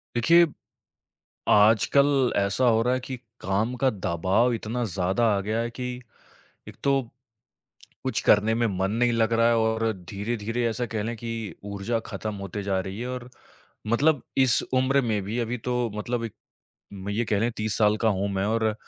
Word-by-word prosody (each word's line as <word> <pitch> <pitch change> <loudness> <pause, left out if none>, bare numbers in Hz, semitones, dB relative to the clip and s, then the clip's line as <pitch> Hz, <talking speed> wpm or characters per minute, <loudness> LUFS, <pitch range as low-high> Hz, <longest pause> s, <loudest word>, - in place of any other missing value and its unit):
देखिए, 170 +8 +6 1.0
आजकल 125 +6 +4
ऐसा 100 +5 +1
हो 115 -1 +4
रहा 125 +2 +2
है 130 - -1
कि 130 +1 -6 0.2
काम 105 +6 0
का 130 - +5
दबाव 95 +5 +1
इतना 115 +2 -3
ज़्यादा 95 +2 0
आ - - 0
गया 110 +3 -2
है 115 0 -2
कि 125 +1 -5 0.8
एक - - -11
तो 140 -1 +3 1.0
कुछ - - -1
करने 105 +2 +4
में 120 +1 +1
मन 95 +1 +1
नहीं 120 +2 +2
लग 115 0 +2
रहा 115 0 +4
है 120 - +4
और 110 0 +1 0.2
धीरे-धीरे 110 +3 -3
ऐसा 120 +2 -2
कहलें 110 +1 -3
कि 115 +1 -5 0.3
ऊर्जा 100 +3 -2
ख़त्म 110 -1 -4
होती 100 +1 -5
जा 95 -1 0
रही 95 +2 -5
है 125 - -3
और 125 -1 -6 0.6
मतलब 140 +5 +3 0.2
इस 130 -4 +4
उम्र 130 +2 +3
में 110 -5 0
भी, 110 +5 -3
अभी 120 +1 -2
तो 125 0 -1
मतलब 120 +3 -2
एक, 115 - -7 0.6
म 100 0 -7
ये 110 +4 0
कहलें, 110 +2 +1
30 110 -1 -1
साल 105 -1 +4
का 110 +1 +1
हूँ 100 -1 0
मैं 95 0 0
और 110 0 +1
115 Hz, 180 wpm, -25 LUFS, 105-120 Hz, 1.0 s, देखिए